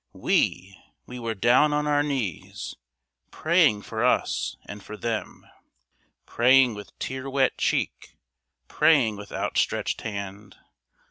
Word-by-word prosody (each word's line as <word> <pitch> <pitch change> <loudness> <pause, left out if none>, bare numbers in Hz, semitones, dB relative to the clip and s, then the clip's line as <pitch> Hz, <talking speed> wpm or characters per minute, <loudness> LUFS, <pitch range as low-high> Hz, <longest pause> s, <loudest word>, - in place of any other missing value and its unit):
We, 100 +2 0 0.3
we 125 0 -8
were 115 -1 -3
down 125 +8 +4
on 150 0 0
our 145 -1 +2
knees, 130 - -4 0.5
Praying 155 - +2
for 110 +1 -3
us 125 - 0
and 105 0 -9
for 105 - -9
them, 115 -1 -4 0.8
Praying 125 0 +4
with 105 -1 -11
tear 130 +1 -5
wet 135 -1 +1
cheek, - - -2 0.5
Praying 130 -9 +3
with 100 0 -10
outstretched - - -1
hand. 100 -1 -7
120 Hz, 120 wpm, -25 LUFS, 105-135 Hz, 0.8 s, down